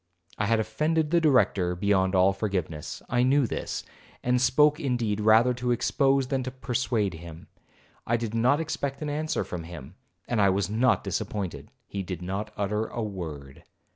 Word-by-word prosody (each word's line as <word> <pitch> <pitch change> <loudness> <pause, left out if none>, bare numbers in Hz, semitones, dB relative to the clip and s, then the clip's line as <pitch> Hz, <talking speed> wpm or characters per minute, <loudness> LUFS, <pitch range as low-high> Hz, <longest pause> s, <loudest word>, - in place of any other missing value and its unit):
I 105 - +1
had 115 0 +3
offended 150 +8 0
the 170 -1 +4
Director 100 - +3
beyond 95 0 +1
all 95 +1 +5
forgiveness. 95 -7 -4
I 120 0 +1
knew 135 +2 +4
this, - - -4 0.4
and 125 0 +2
spoke 150 +4 +4
indeed 120 -8 -1
rather 110 +4 +5
to 125 0 -3
expose 135 +2 +2
than 135 -2 0
to 130 - -4
persuade 125 -5 -1
him. 85 0 -10 0.6
I 120 - +2
did 115 -2 -4
not 125 +6 +3
expect 140 -3 -3
an 150 - -2
answer 155 +1 -1
from 90 - -6
him, 80 -3 -10 0.3
and 115 -3 +1
I 100 - +5
was 95 0 0
not 120 +3 +2
disappointed,—he 100 -1 -5
did 90 -1 -6
not 100 +4 -4
utter 105 +2 -1
a 120 - -4
word. 80 -10 -7
110 Hz, 170 wpm, -27 LUFS, 95-130 Hz, 0.6 s, all